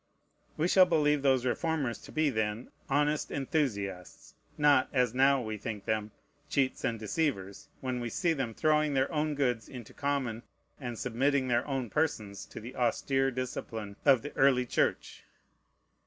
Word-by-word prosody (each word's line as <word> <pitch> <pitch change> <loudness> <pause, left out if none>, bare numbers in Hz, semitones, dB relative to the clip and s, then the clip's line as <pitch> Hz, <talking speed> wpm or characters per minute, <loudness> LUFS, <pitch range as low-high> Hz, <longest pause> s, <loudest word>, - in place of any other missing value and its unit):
We 160 - +2
shall 185 0 +6
believe 150 -4 +2
those 130 -2 +3
reformers 135 - -1
to - - -13
be 155 -2 +1
then 110 0 -2 0.2
honest 145 +2 +1
enthusiasts, 105 - -3 0.2
not, 145 -3 +4
as 125 -3 +2
now 135 0 +4
we 110 -1 -5
think 105 -2 -5
them, 110 -1 -1 0.4
cheats 135 -2 0
and 115 - 0
deceivers, 110 - -2
when 130 -1 -2
we 120 -1 -3
see 170 +5 +1
them 130 -7 -3
throwing 155 -2 +2
their 135 +3 +1
own 150 -1 0
goods 125 -5 0
into 125 -4 -10
common, 135 -5 -2 0.4
and 120 -4 -5
submitting 130 +3 0
their 120 +2 +1
own 135 -5 -2
persons 110 -11 -1
to - - -9
the 120 +4 -9
austere 135 +2 +1
discipline 115 -5 -5
of 135 -4 +5
the 145 - -6
early 135 -2 +4
Church. - - -1
130 Hz, 155 wpm, -30 LUFS, 115-145 Hz, 0.4 s, shall